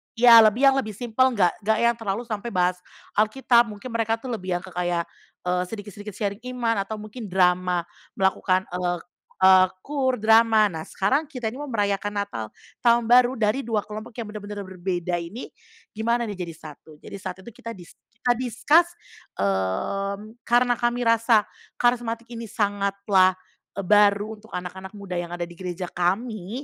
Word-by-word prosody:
iya, 230 0 +9
lebih 215 +5 +2
yang 270 - +1
lebih 215 -5 -2
simpel 245 +3 +1
nggak 180 -4 +4
nggak 220 0 +3
yang 235 0 +4
terlalu 210 +1 -2
sampai 225 -1 -5
bahas 180 0 +1 0.4
Alkitab, 235 +2 +4
mungkin 210 +4 -8
mereka 225 -1 0
tuh 245 +3 -9
lebih 185 -5 -2
yang 175 - -4
ke 190 - -10
kayak, 175 -1 -1 0.4
eee, 180 0 0
sedikit-sedikit 205 -1 -8
sharing 200 0 -3
iman 230 -5 0
atau 220 - -5
mungkin 215 +2 -8
drama 180 -1 +2 0.3
melakukan, 190 -1 +1
ek 175 -1 -2 0.4
eee, 185 0 +7 0.2
KUR, 270 -3 0
drama. 220 -2 +5
Nah 160 -1 -6
sekarang 275 +11 0
kita 245 -7 -4
ini 260 - -9
mau 295 - -5
merayakan 205 -3 -1
Natal 200 - -3 0.3
Tahun 235 -1 +4
Baru 250 +1 +6
dari 215 +4 +1
2 215 -3 0
kelompok 215 +2 -9
yang 230 -3 -6
benar-benar 205 -1 -6
berbeda 180 -2 -3
ini 170 +9 -8 0.4
gimana 235 +2 0
nih 205 -4 -5
jadi 165 - -7
satu? 155 0 -13
Jadi 200 - -9
saat 190 0 -7
itu 235 - -10
kita 230 +1 -8
dis 175 -3 -13 0.2
kita 235 +2 0
discuss, 290 +8 +3 0.5
mmm, 195 - -2
karena 245 0 +3
kami 240 0 0
rasa 230 -1 +4 0.3
karismatik 240 -1 0
ini 230 -1 -6
sangatlah 200 -3 +2 0.4
e 200 - -2
baru 205 +2 +3
untuk 220 - -18
anak-anak 190 +2 -7
muda 195 -3 -6
yang 175 0 -5
ada 175 - -3
di 170 - -14
gereja 180 -1 -5
kami, 210 +5 -2
210 Hz, 170 wpm, -24 LUFS, 185-235 Hz, 0.5 s, iya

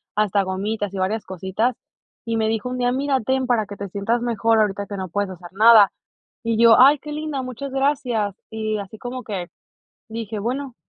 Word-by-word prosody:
hasta 205 -1 +2
gomitas 200 +2 -3
y - - -5
varias 200 +4 -1
cositas, 190 +6 -1 0.5
y 230 0 -1
me 220 -1 +1
dijo 225 +1 -2
un 255 - -4
día: 245 0 +1
"Mira, 270 0 0
ten 260 +3 0
para 235 -4 +2
que 200 0 -9
te 200 - -5
sientas 205 +5 -1
mejor, 230 -1 +2
ahorita 200 -1 0
que 200 - -6
no 190 -1 -4
puedes 205 +2 -1
hacer 175 -1 -10
nada". 215 0 +7 0.5
Y 230 -1 0
yo, 230 -1 +8
"Ay, 275 +3 +7
qué 300 +2 -8
linda, 300 -2 -3
muchas 255 +2 -6
gracias". 260 -7 0 0.2
Y 215 -1 -2
así 200 +2 -8
como 250 +1 -6
que 190 -5 -4 0.6
dije, 225 -1 -5
bueno, 255 +4 -3
220 Hz, 200 wpm, -22 LUFS, 200-250 Hz, 0.6 s, yo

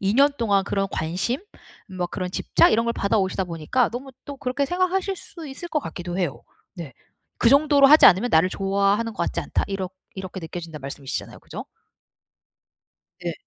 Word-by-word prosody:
2 200 +2 +1
년 280 +2 +5
동안 200 -4 +2
그런 195 -1 -1
관심 180 - -2 0.6
뭐 175 -1 -1
그런 180 0 -4
집착 - - +3
이런 230 +1 +3
걸 235 - 0
받아오시다 195 -3 0
보니까 170 +9 0
너무 260 +3 -6
또 285 - -7
그렇게 270 +1 -1
생각하실 370 +3 0
수 330 -2 -11
있을 290 +6 -8
것 315 -2 0
같기도 175 -5 -6
해요. 175 -7 -2 0.3
네. 165 -8 -8 0.5
'그 230 - +4
정도로 285 0 +6
하지 305 +2 +9
않으면 205 +6 +5
나를 160 +3 +4
좋아하는 200 +4 0
것 - - -2
같지 - - -2
않다.' - - -1
이렇 195 -2 -4 0.2
이렇게 190 0 -7
느껴진다는 165 -2 -7
말씀이시잖아요. 135 0 -6
그죠? - - -8 1.6
네. - - -3
200 Hz, 370 characters per minute, -23 LUFS, 180-270 Hz, 1.6 s, 하지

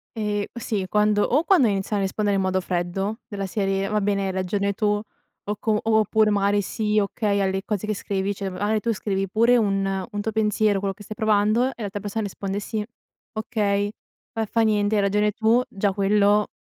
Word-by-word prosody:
Ehm, 210 -2 -1
sì, 215 -4 -2
quando 210 +1 +2
o 290 +6 +2
quando 345 - +4
iniziano 200 0 -1
a 195 - +1
rispondere 205 +1 0
in - - +1
modo 185 0 +1
freddo, 185 +5 -2
della 200 -3 -4
serie: 195 0 -1
"Va 210 0 0
bene 200 -1 0
hai 190 - -1
ragione 200 +2 -1
tu", 210 - -2 0.6
o 210 +1 -3
com 215 -2 +1
oppure 220 -1 +3
magari: 200 0 +2
"Sì, 215 +1 0
okay" 200 0 0
alle 190 -1 0
cose 210 -1 -2
che 215 - -1
scrivi, 195 0 -2
cioè 195 -1 -4
magari 205 +4 0
tu 230 +2 0
scrivi 195 -1 -2
pure 230 +5 +4
un 195 -3 +1 0.3
un 205 - -3
tuo 220 +1 -2
pensiero, 215 -1 +2
quello 195 0 -2
che 205 - -13
stai 215 - -8
provando 215 +3 +2
e 265 - -7
l'altra 205 0 -4
persona 210 +2 -3
risponde: 200 0 -4
"Sì, 210 +1 -3 0.5
okay, 205 -2 0 0.4
fa 225 -2 -2
fa 230 +2 0
niente, 210 -1 +2
hai 205 - +3
ragione 210 +1 +2
tu", 225 +3 +3
già 195 0 0
quello, 205 +1 +3
205 Hz, 200 wpm, -24 LUFS, 195-215 Hz, 0.6 s, quando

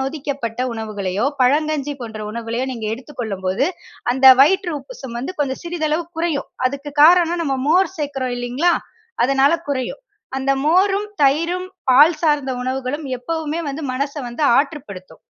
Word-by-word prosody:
நொதிக்கப்பட்ட 270 -4 -4
உணவுகளையோ, 210 -1 -2 0.2
பழங்கஞ்சி 295 +1 +1
போன்ற 220 -2 -7
உணவுகளையோ 235 +3 -3
நீங்க 225 -3 -5
எடுத்துக் 260 +2 -10
கொள்ளும்போது, 195 +3 -1 0.5
அந்த 265 +1 +3 0.2
வயிற்று 365 +2 +2
உப்புசம் 265 - -9
வந்து 370 +9 -5
கொஞ்சம் 265 +1 -2
சிறிதளவு 330 -1 -1
குறையும். 330 -4 -1 0.2
அதுக்கு 280 +2 -5
காரணம் 345 0 +5
நம்ம 270 -2 0
மோர் 375 +3 +3
சேர்க்கிறோம் 270 -4 -3
இல்லேங்களா, 255 +9 +1 0.5
அதனால 275 +3 +3 0.2
குறையும். 260 - -3 0.3
அந்த 270 +1 +1
மோரும், 390 +6 +3 0.2
தயிரும் 335 +6 +2 0.3
பால் 300 +6 +6
சார்ந்த 295 -4 +1
உணவுகளும் 265 +3 -3
எப்பவுமே 320 +4 -3
வந்து 290 +3 -5
மனச 280 +2 -2 0.2
வந்து 240 +6 -5
ஆற்றுப்படுத்தும். 265 - -3
280 Hz, 135 wpm, -20 LUFS, 250-320 Hz, 0.5 s, பால்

